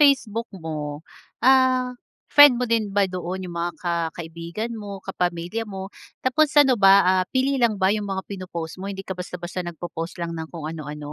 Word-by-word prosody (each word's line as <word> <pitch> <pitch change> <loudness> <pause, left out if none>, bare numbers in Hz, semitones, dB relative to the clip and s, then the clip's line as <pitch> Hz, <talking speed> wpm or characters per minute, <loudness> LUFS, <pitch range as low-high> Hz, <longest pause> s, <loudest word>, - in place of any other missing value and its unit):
Facebook 240 -6 +3 0.2
mo 160 -1 -3 0.7
ah, 255 -1 +3 0.5
friend 290 -3 +10
mo - - +2
din 225 -1 +3
ba 200 - +5
doon 185 +1 -4
yung 175 -1 -8
mga 175 +1 -1
ka 175 - 0 0.3
kaibigan 170 +7 -5
mo, 205 -1 -7
kapamilya 180 +3 -2
mo? 190 - -5 0.4
Tapos 275 +4 +3
ano 265 -2 +3
ba 195 - +9 0.2
ah, 185 0 +3
pili 265 +1 +2
lang 230 -2 +4
ba 190 - +5
'yung 210 -1 -3
mga 190 0 -2
pino-post 180 -4 -6
mo? 200 - -4
Hindi 195 -1 -6
ka 190 - -2
basta-basta 180 0 -5
nagpo-post 175 0 -6
lang 170 0 -3
ng 160 -1 -5
kung 165 -3 -7
ano-ano? 150 -2 -7
190 Hz, 185 wpm, -23 LUFS, 170-230 Hz, 0.7 s, friend